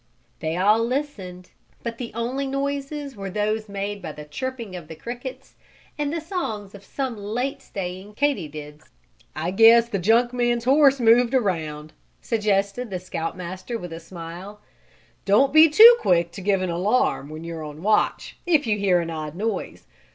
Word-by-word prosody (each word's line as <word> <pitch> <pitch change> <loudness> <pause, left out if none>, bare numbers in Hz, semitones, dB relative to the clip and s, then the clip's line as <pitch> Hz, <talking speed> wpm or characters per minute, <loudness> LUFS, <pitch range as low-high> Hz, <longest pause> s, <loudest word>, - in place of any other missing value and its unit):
They 160 +1 -2
all 210 +5 +4
listened, 225 -9 -4 0.3
but 230 -1 -5
the 240 -2 -5
only 255 +4 -2
noises 280 +1 -3
were 195 -1 -6
those 215 +2 -2
made 200 0 -4
by 155 - -6
the 150 0 -10
chirping 230 - -5
of 170 -4 -8
the 160 - -9
crickets 245 - -8 0.4
and 295 -1 -2
the 335 - -2
songs 225 - -4
of 200 -1 -12
some 260 +3 -4
late 245 +7 -3
staying 190 -1 -7
Katy 280 - 0
dids. 150 0 -11 0.5
"I 165 +3 -2
guess 230 +3 +6
the 200 - -1
junk 230 +6 +3
man's 240 -1 0
horse 275 +1 +5
moved 240 +2 +4
around," 155 -9 -2 0.3
suggested 210 +1 -1
the 190 - -3
Scout 175 -2 -5
Master 185 +6 -5
with 175 -5 -8
a 165 - -6
smile. 175 +4 -9 0.7
"Don't 240 +8 +4
be 315 +1 +8
too 460 +10 +9
quick 170 - +2
to 195 - -9
give 195 -1 +1
an 180 - -1
alarm, 180 - 0
when 155 +1 -8
you're 165 -1 -6
on 150 +2 -9
watch, 210 +1 0
if 315 -5 +3
you 210 -2 0
hear 185 -3 +3
an 165 0 -5
odd 155 -1 -5
noise. 220 +3 -4
210 Hz, 175 wpm, -23 LUFS, 180-250 Hz, 0.7 s, too